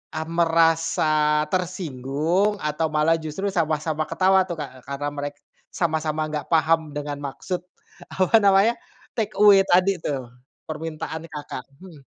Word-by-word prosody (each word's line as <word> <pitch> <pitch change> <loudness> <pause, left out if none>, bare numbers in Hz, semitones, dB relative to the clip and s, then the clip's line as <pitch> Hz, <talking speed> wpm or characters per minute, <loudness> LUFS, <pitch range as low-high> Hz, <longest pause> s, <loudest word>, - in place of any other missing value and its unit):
ah, 160 - -2
merasa 165 -2 +2
tersinggung 175 +2 0
atau 150 +1 0
malah 155 +2 +2
justru 175 +6 -3
sama-sama 155 -2 -1
ketawa 190 0 +3
tuh, 175 - -4
Kak? 150 -3 -5
Eee, - - -21
karena 140 +1 -3
mereka 145 0 -6 0.3
sama-sama 160 -3 -1
enggak 150 -1 -3
paham 165 0 +4 0.2
dengan 145 -1 -4
maksud, 145 +6 -4 0.5
apa 190 +4 +4
namanya 200 +3 +5 0.4
take 215 -1 -1
away 205 -2 +8
tadi 185 +2 +4
tuh, 130 -4 -3 0.4
permintaan 160 0 -5
Kakak? 150 -4 -7 0.2
Hmm. 165 -7 -13
160 Hz, 135 wpm, -23 LUFS, 150-180 Hz, 0.5 s, away